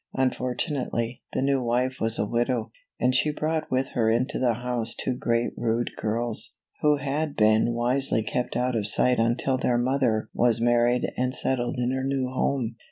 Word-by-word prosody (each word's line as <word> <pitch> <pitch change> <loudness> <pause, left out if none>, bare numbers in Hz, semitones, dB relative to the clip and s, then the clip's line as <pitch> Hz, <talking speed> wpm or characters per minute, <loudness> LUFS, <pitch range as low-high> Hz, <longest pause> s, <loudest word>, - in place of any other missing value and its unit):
Unfortunately, 125 -2 -2
the - - 0
new 135 -1 +1
wife 125 +2 0
was 115 0 0
a - - 0
widow, 120 +3 -1 0.3
and 125 - +2
she 140 +4 +2
brought 155 +1 -2
with 130 +1 0
her 115 -3 0
into 125 +6 0
the 120 -3 +2
house 120 -1 -2
two 130 - -2
great 120 -1 -1
rude 120 0 -1
girls, 115 +1 +3 0.3
who 150 0 +4
had 145 +2 -3
been 110 +2 +3
wisely 120 -1 +1
kept 125 +3 -3
out 125 0 0
of 105 -2 -1
sight 125 +3 +3
until 120 +3 +1
their 120 -1 +1
mother 120 -3 0
was 120 -1 +2
married 120 +1 +2
and 125 +1 -1
settled 120 -2 -1
in 125 0 0
her 130 0 -2
new 135 -1 -1
home. 130 -3 -1
125 Hz, 175 wpm, -25 LUFS, 115-130 Hz, 0.3 s, who